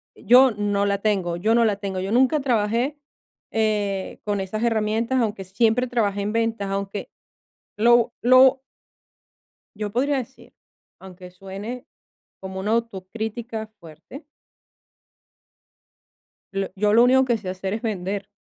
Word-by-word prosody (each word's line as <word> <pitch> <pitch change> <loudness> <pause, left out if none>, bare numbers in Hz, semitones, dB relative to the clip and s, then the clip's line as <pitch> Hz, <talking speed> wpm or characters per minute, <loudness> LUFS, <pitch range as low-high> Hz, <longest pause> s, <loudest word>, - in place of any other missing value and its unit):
yo 255 +2 +5
no 205 -1 -1
la 200 0 +1
tengo. 190 -5 0
Yo 215 +6 +2
no 235 - +4
la 210 -3 +1
tengo, 195 -2 -4
yo 195 +2 -4
nunca 260 +5 +3
trabajé, 240 +3 0 0.5
eh, 205 -3 -1
con 205 -2 -1
esas 215 +4 -4
herramientas, 225 +2 0
aunque 210 -3 -2
siempre 225 +6 +1
trabajé 210 -5 -1
en 205 +1 -2
ventas. 225 -3 -1
Aunque 200 +1 -4 0.7
lo 235 +2 +4
lo 260 +2 +6 1.1
Yo 210 0 -4
podría 275 +5 +1
decir, 260 0 -8 0.4
aunque 185 -1 -12
suene 195 +7 -8 0.6
como 190 0 -6
una 205 +3 -2
autocrítica 220 +1 -4
fuerte 170 - -13 2.3
lo 195 0 -2
yo 210 +1 +2
lo 230 +2 +6
único 260 +1 +5
que 240 -3 0
sé 200 -3 -8
hacer 190 +1 -4
es 220 - -5
vender. 200 -2 -3
215 Hz, 135 wpm, -23 LUFS, 195-235 Hz, 2.3 s, lo